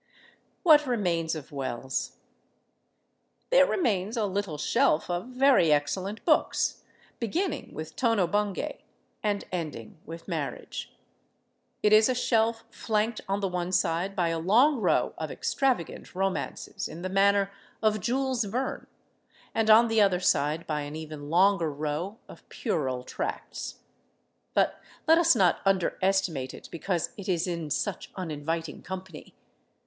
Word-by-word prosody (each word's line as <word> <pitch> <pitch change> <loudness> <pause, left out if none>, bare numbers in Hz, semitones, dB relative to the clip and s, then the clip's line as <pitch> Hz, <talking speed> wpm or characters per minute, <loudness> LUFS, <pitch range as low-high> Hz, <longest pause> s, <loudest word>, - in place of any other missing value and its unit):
What 300 -5 +6
remains 175 -9 0
of 155 -3 -8
Wells? 130 -1 -3 1.4
There - - +6
remains 220 - 0
a 220 - +1
little 195 -5 -2
shelf 180 - +2
of 175 +5 -2
very 255 - +4
excellent 185 +8 -1
books, 310 - +2 0.4
beginning 335 - -2
with 155 0 -7
"Tono 230 -7 +2
Bungay" 205 +1 -2 0.4
and 205 -1 0
ending 155 -8 -5
with 165 +2 -9
"Marriage." - - -4 0.9
It 210 - +5
is 215 +3 +7
a 255 - +1
shelf 225 -2 +1
flanked 220 +1 -1
on 200 +1 0
the 195 - +1
one 180 -1 -3
side 180 +2 0
by 175 -4 +1
a 165 0 -1
long 240 - +4
row - - +2
of - - -3
extravagant 255 - -1
romances 190 0 -2
in 170 +2 -9
the - - -1
manner 200 +1 +3 0.3
of 215 -1 +3
Jules 255 +2 0
Verne, 245 +7 -3 0.7
and 225 -1 +1
on 225 +2 +8
the 225 -1 +3
other 190 -3 +4
side 155 -2 +1
by 150 -1 -2
an 145 +1 -6
even 155 -2 -7
longer 180 -1 +3
row 155 +8 -3
of - - -15
puerile 135 - -2
tracts. - - -5 0.7
But - - +2 0.3
let 325 +1 +7
us 335 0 +5
not 180 -3 +3
underestimate 190 -6 +1
it - - -12
because 170 0 -2
it 200 -1 -6
is 175 -3 +1
in 170 -4 -3
such 195 +6 -2
uninviting 165 -2 -4
company. 185 -3 -8
190 Hz, 140 wpm, -28 LUFS, 165-220 Hz, 1.4 s, on